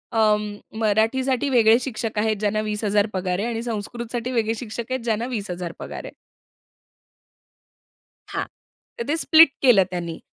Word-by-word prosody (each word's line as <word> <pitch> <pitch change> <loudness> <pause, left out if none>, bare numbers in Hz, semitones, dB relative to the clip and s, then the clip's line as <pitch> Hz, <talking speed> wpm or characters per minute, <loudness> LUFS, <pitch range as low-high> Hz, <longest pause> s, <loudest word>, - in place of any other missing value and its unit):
अं, 210 -1 +2 0.2
मराठीसाठी 235 +5 +1
वेगळे 230 -2 +5
शिक्षक 225 -4 -4
आहेत 215 0 +1
ज्यांना 215 0 0
20,000 210 -1 0
पगार 185 0 -1
आहे 220 - -1
आणि 230 -1 -3
संस्कृतसाठी 235 +2 -4
वेगळे 225 -2 +1
शिक्षक 230 +1 -6
आहेत 260 - 0
ज्यांना 225 0 0
20,000 185 -8 -4
पगार - - -7
आहे. - - -9 2.2
हां, - - -2 0.5
तर 470 - -2
ते 305 - +1
स्प्लिट 325 0 +7
केलं 245 -8 +6
त्यांनी 170 -2 -4
220 Hz, 140 wpm, -23 LUFS, 210-240 Hz, 2.2 s, स्प्लिट